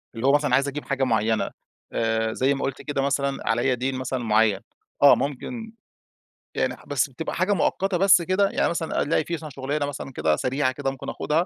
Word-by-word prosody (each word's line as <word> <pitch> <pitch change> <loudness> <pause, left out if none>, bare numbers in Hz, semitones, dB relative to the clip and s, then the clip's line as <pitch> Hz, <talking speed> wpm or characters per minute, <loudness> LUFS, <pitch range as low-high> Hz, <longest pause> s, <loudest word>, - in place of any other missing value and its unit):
اللي 115 +4 -1
هو - - +6
مثلًا 145 -3 +2
عايز 140 +2 +2
أجيب 145 +1 -5
حاجة 140 -1 -1
معينة 110 -2 +1 0.4
آآ، 110 0 0
زي 135 +2 +2
ما 135 - -4
قُلت 135 -1 -3
كده 145 -2 -2
مثلًا 140 -2 -1
عليّا 120 +3 +2
دين 130 +2 -2
مثلًا 130 -1 -3
معين، 110 -3 +3 0.4
آه، 140 - +9
ممكن 225 - -4 0.8
يعني - - 0
بس 145 -1 +1
بتبقى 135 +5 -5
حاجة 185 +4 +2
مؤقتة 190 +1 0
بس 185 -1 +6
كده، 185 +3 +2
يعني - - +1
مثلًا 165 -1 -1
ألاقي 155 +1 +1
مثلًا 160 -1 -4
في - - -13
شغلانة 145 +2 -2
مثلًا 140 -1 -6
كده 75 -7 +1
سريعة 130 - 0
كده 135 +1 -2
ممكن 135 - -7
آخدها 160 +4 0
140 Hz, 200 wpm, -24 LUFS, 125-150 Hz, 0.8 s, آه